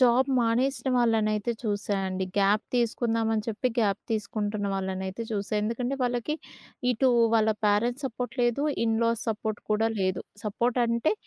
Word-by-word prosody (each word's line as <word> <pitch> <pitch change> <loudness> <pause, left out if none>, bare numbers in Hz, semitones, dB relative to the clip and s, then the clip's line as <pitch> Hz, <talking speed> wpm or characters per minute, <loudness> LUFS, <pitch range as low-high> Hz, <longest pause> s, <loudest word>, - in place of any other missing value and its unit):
Job 255 +1 +5
మానేసిన 245 +4 +1
వాళ్ళనైతే 225 -2 +2
చూసాయండి 195 -3 -1
gap 200 +2 +3
తీసుకుందామని 230 -2 +1
చెప్పి 230 +3 0
గాప్ 205 -3 +2
తీసుకుంటున్న 210 -1 -2
వాళ్ళనైతే 190 +2 -3
చూసా. 205 -2 -3
ఎందుకంటే 240 +4 -1
వాళ్ళకి 245 +4 0 0.6
ఇటు 250 +2 +2 0.3
వాళ్ళ 220 -1 +4 0.2
ప్యారెంట్స్ 240 +7 +1
సపోర్ట్ 250 0 -5
లేదు, 240 +3 +1 0.2
ఇన్ 225 -1 +2
లాస్ 230 -1 +1
సపోర్ట్ 215 -1 -2
కూడా 215 +1 +3
లేదు. 185 -1 0 0.2
సపోర్ట్ 235 +4 0
అంటే 235 +5 +1
225 Hz, 135 wpm, -27 LUFS, 205-240 Hz, 0.6 s, Job